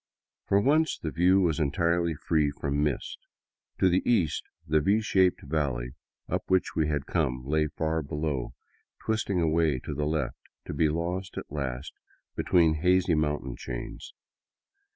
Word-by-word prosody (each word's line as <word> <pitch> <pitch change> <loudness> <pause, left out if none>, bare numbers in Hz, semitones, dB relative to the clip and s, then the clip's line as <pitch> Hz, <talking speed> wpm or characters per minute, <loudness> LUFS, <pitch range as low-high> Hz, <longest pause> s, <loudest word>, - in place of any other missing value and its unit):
For 100 - +4
once 155 +8 +2
the 80 - -4
view 90 +4 +4
was 85 -4 +1
en 75 -3 +2
tirely 85 +2 +1
free 75 0 +1
from 70 0 -2
mist. 75 -4 -2 0.6
To - - +4
the 90 +1 +3
east, 90 -11 +2 0.2
the 75 +1 +2
V 100 +8 +3
shaped 95 -4 +2
valley 70 -5 -2 0.4
up - - -1
which 95 -1 +1
we 80 -2 +2
had 75 -3 -1
come 65 0 -1
lay 75 +2 +1
far 80 +1 -1
below, 75 -3 -3 0.5
twisting 110 -4 0
away 80 -3 +2
to 75 - -5
the 75 +1 -1
left, 75 -4 -2 0.3
to - - -5
be 80 - +2
lost 85 +4 -3
at - - -6
last 70 -2 -4 0.4
be - - -1
tween 80 -3 +3
hazy 90 0 +3
mountain 75 -4 -1
chains. - - -7
80 Hz, 160 wpm, -28 LUFS, 75-90 Hz, 0.6 s, For